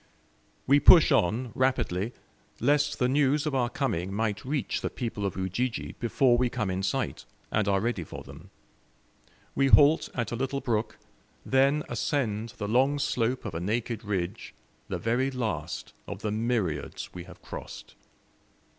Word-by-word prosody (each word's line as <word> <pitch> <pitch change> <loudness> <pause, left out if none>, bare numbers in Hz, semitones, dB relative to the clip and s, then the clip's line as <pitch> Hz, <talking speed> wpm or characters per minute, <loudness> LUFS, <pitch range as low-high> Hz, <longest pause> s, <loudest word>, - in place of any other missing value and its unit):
We 140 +2 +5
push 160 +1 +8
on 115 0 +2
rapidly, 120 -6 0 0.5
lest 145 +3 +2
the 125 - +2
news 145 +2 +2
of 150 - -1
our 125 -2 +1
coming 95 - -2
might 105 0 -1
reach 140 +2 -2
the - - -2
people 110 -4 -3
of 95 - -6
Ujiji 105 +7 -2
before 120 +1 +3
we 125 -1 +2
come 105 -4 -2
in 95 +1 -2
sight, 95 - -2 0.3
and 105 -1 +1
are 100 -1 +3
ready 110 -4 -1
for - - -9
them. - - -13 1.0
We 135 - +2
halt 145 +3 +6
at 120 -2 -2
a - - -1
little 135 +3 -2
brook, 115 -4 -2 0.5
then 140 +3 +3
ascend 115 -3 -2
the 105 - -3
long 130 +6 +3
slope 125 -2 -1
of - - -4
a 80 - -3
naked 115 +3 -2
ridge, 100 0 -3 0.3
the - - -3
very 125 +4 0
last 110 - -4
of - - -7
the 105 - -1
myriads 105 - -2
we 90 -1 -8
have 90 -1 -14
crossed. - - -9
120 Hz, 160 wpm, -28 LUFS, 105-135 Hz, 1.0 s, push